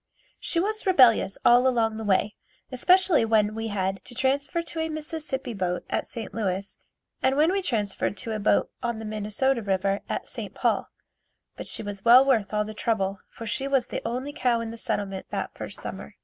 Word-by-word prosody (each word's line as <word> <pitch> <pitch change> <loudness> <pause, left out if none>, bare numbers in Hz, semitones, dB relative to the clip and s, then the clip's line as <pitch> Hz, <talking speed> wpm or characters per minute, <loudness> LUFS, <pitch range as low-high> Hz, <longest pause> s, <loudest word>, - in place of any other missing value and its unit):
She 335 - 0
was 430 +3 -1
rebellious 250 - +5
all 245 +2 +6
along 225 -3 +1
the 220 - -5
way, 205 +1 +2 0.4
especially 360 +3 +4
when 215 -2 +2
we 225 +1 -3
had 195 -2 -2
to 245 - -10
transfer 275 +6 0
to 330 0 -6
a 320 0 -1
Mississippi 305 -5 -4
boat 180 -3 -2
at - - -1
St. 230 -2 -7
Louis, 195 -2 -3 0.4
and 265 +1 +2
when 315 +4 +4
we 395 +1 0
transferred 210 - -1
to 225 +4 -6
a 215 - -2
boat 205 - +2
on 235 -2 -2
the 220 - -7
Minnesota 215 +5 0
river 195 -1 0
at - - -3
St. - - -7
Paul, - - 0 0.7
but - - -7
she - - -3
was 205 -1 -6
well 245 +3 +8
worth 230 -7 +2
all 210 0 0
the 215 - -7
trouble 195 -3 -1
for 230 - -9
she 265 +5 -1
was 270 -3 +2
the - - -3
only 255 +5 -3
cow 245 -4 +1
in 230 -1 -4
the - - -7
settlement 195 -3 -2
that - - -3
first - - -8
summer. - - -7
230 Hz, 200 wpm, -26 LUFS, 205-270 Hz, 0.7 s, well